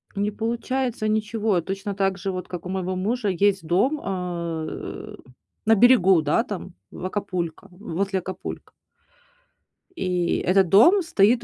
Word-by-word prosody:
Не 205 +1 0
получается 235 +1 -2
ничего, 215 -3 0
точно 195 +3 -4
так 195 -1 0
же 195 +1 -3
вот 185 0 -5
как 180 -1 -7
у - - -5
моего 185 0 -2
мужа 215 +5 -1
есть 195 -1 +1
дом, 250 - +2
а, 170 -4 -3
э, - - -7 0.5
на 225 +1 +5
берегу, 195 -6 +6
да, 155 +10 +2
там 190 -5 -7 0.2
в 185 - -7
Акапулько, 185 -2 -3
возле 195 +1 -2
Акапулько. 185 +1 -7 1.3
И 180 -2 0
этот 185 -1 +4
дом 340 - +6
стоит 235 - +3
195 Hz, 140 wpm, -24 LUFS, 180-220 Hz, 1.3 s, берегу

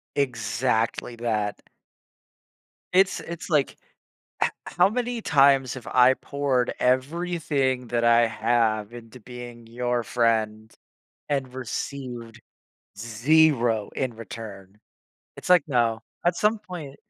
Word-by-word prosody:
exactly 115 -2 -1
that. 110 -3 -2 1.3
It's 190 +1 +4
it's, 170 +1 -8
like, 150 -4 +1 0.7
"H - - +2 0.2
how 180 +2 +3
many 245 0 -2
times 135 -5 +4
have 130 - -10
I 125 +1 +5
poured 135 -4 -1
everything 135 -1 0
that 120 0 -1
I 120 0 +5
have 110 -1 0
into 120 +1 -11
being 120 0 -10
your 120 0 -1
friend 110 -2 0 0.6
and 135 -3 -2
received 120 -2 -6 0.6
0 115 0 +2
in 130 -4 -2
return." 105 -4 -10 0.6
It's - - -8
like, 180 -5 +6
no, 115 -5 +1 0.2
at 175 0 +2
some 215 +1 +2
point 175 -9 -9
125 Hz, 110 wpm, -25 LUFS, 115-140 Hz, 1.3 s, like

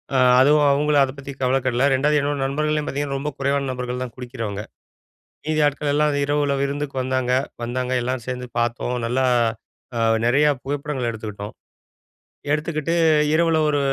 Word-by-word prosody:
அ, - - +4 0.2
அதுவும் 145 +2 +5
அவுங்களும் 145 +1 +3
அத 135 - -1
பத்தி 140 0 -7
கவலைப்படவில்லை 130 0 +2
2வது 150 +3 +2
என்னோட 145 0 -1
நண்பர்கள்லயும் 150 +2 -1
பார்த்தீங்கன்னா, 140 0 -2
ரொம்ப 150 +2 -3
குறைவான 140 0 0
நபர்கள் 125 0 -4
தான் 120 - -11
குடிக்கிறவங்க. 115 -5 -5 0.9
மீதி 155 0 0
ஆட்கள் 145 0 -1
எல்லாம் 150 0 +2
இரவுல 145 0 +1
விருந்துக்கு 140 0 -3
வந்தாங்க, 130 -1 -1 0.3
வந்தாங்க 125 +1 -3
எல்லோரும் 125 -1 -3
சேர்ந்து 125 0 -4
பார்த்தோம். 120 +1 -1
நல்லா 130 +2 +1 0.7
அ, - - -1 0.3
நெறையா 140 +5 +4
புகைப்படங்கள் 140 -2 -3
எடுத்துக்கிட்டோம். 105 -2 -7 1.0
எடுத்துக்கிட்டு 155 +1 -1 0.4
இரவுல 165 0 +3
ஒரு 145 -1 +1
140 Hz, 140 wpm, -22 LUFS, 125-150 Hz, 1.0 s, அதுவும்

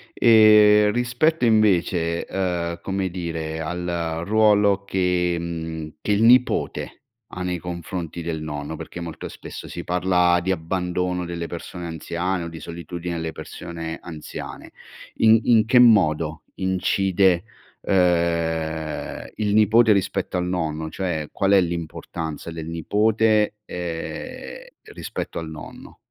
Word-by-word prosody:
E 105 -2 +6
rispetto 125 +7 +1
invece, 90 -7 +2
uhm, 85 -3 -2
come 95 -1 -2
dire, 80 -3 -4
al 85 -1 -3
ruolo 105 -2 +3
che, 90 -2 +1
mhmm, 80 -2 -5
che - - -1
il 105 +1 +2
nipote 125 +2 +2 0.3
ha 90 - -5
nei 90 0 -1
confronti 85 0 -5
del 80 -1 -3
nonno, 75 0 -5
perché 80 +2 -8
molto 85 -2 -6
spesso - - -9
si 85 - -6
parla 90 0 +2
di 90 +2 -1
abbandono 90 +1 -2
delle 85 -1 -4
persone 85 +1 -7
anziane 85 +2 -3
o - - -5
di 80 -1 -8
solitudine 85 +2 -6
alle 80 -1 -3
persone 80 -1 -7
anziane. 80 -3 -8 0.4
In 110 0 +5
in 115 -3 +5
che 125 +2 +5
modo 80 -9 +4
incide, 95 -1 +2 0.4
uhm, 85 -4 0
il 105 -1 0
nipote 110 +1 +5
rispetto 95 -2 -1
al 90 - -1
nonno? 80 -3 -2
Cioè 85 -6 -3
qual 100 0 +1
è 100 - +7
l'importanza 85 -1 -5
del 80 -1 -6
nipote, 105 +6 +2
ehm, 85 -2 -6 0.3
rispetto - - -5
al 80 -1 -6
nonno? 80 -1 -11
90 Hz, 125 wpm, -23 LUFS, 80-100 Hz, 0.4 s, è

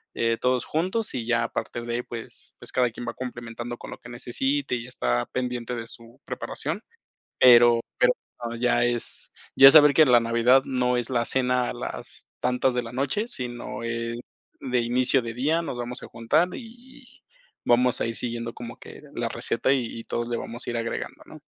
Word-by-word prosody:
eh, 115 0 +1
todos 125 -1 +1
juntos, 185 +8 -1
y 120 -3 -3
ya 120 0 +2
a - - -1
parte 120 - -4
de 120 0 -3
ahí, 120 - -1
pues, 115 -2 -9
pues - - -10
cada 125 -1 +2
quien 120 - -8
va - - -3
complementando 120 -1 -6
con - - -10
lo - - -7
que 120 - -12
necesite 135 +3 -1
y 120 -1 -5
está - - -1
pendiente 125 -1 -3
de 115 -1 -6
su 115 0 -9
preparación, - - -4 0.6
pero 120 -2 +7 0.2
pero 125 0 +4 0.5
ya 120 -1 +3
es 120 -1 -3 0.2
ya 135 - +10
es 135 - +9
saber 150 -2 +8
que 155 - +7
la 125 -2 +6
Navidad 120 +3 +4
no 125 -1 +1
es 120 0 -2
la 120 -2 +1
cena 125 -1 +1
a - - -4
las 120 - -7
tantas 125 0 +1
de 125 - 0
la 115 +1 -9
noche, 140 - -1
sino, 120 - -3
eh, 115 0 -3 0.4
de 125 -2 0
inicio 125 +2 +2
de 115 -1 -5
día, 155 +6 +1
nos 130 - -5
vamos 120 +1 -5
a - - -8
juntar 150 +10 +1
y 245 +3 -11
y 245 - -20 0.4
vamos 125 +1 +3
a - - +2
ir 115 - -3
siguiendo 115 -1 -4
como 120 -1 -8
que - - -12
la - - -1
receta 135 - 0
y 120 -3 -2
y - - -8
todos 120 +1 -3
le 120 -1 -2
vamos 120 +2 -5
a - - -1
ir 120 - -2
agregando, 115 0 -4
¿no? - - -13
120 Hz, 205 wpm, -25 LUFS, 120-130 Hz, 0.6 s, ya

